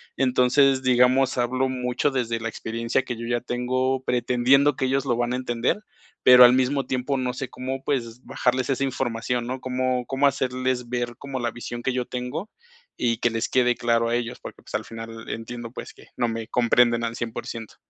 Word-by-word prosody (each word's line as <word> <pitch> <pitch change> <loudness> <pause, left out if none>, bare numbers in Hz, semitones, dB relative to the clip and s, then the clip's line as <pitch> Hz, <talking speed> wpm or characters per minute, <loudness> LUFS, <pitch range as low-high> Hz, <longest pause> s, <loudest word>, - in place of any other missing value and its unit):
Entonces, 130 +1 +3
digamos, 130 +1 +3
hablo 130 +2 +1
mucho 125 +2 -1
desde 115 -3 -1
la 115 - -3
experiencia 115 +3 -2
que 120 -2 -5
yo 115 - -6
ya 120 0 0
tengo, 130 +2 -1
pretendiendo 125 +3 +3
que 130 - 0
ellos 135 +1 +1
lo 120 -3 0
van 120 0 0
a - - 0
entender, 125 - -1 0.4
pero 125 0 +9
al 120 - +6
mismo 130 +1 +1
tiempo 130 +2 -1
no 125 -1 -1
sé 130 +1 -5
cómo, 130 +1 -5
pues, 125 -3 -3
bajarles 130 +1 0
esa 135 0 0
información, 120 -2 -2
¿no?, 130 +1 -3
cómo 130 0 -3 0.2
cómo 135 +2 +2
hacerles 130 -2 -1
ver 120 -1 -2
como 135 -1 -5
la 120 -1 -1
visión 120 0 -7
que 130 - 0
yo 125 -1 -1
tengo, 130 - -5 0.5
y 115 -2 +1
que 120 - +1
les 115 +1 -2
quede 125 -1 +3
claro 115 -1 +1
a 120 - +1
ellos, 120 0 -3
porque, - - -10
pues, - - -15
al - - -2
final 115 0 -9
entiendo, 115 +1 -6
pues, - - -8
que - - -18
no 120 - +1
me 115 -1 -4
comprenden 120 0 +3
al 115 0 -2
100%. 115 -1 -6
125 Hz, 200 wpm, -24 LUFS, 120-130 Hz, 0.5 s, pero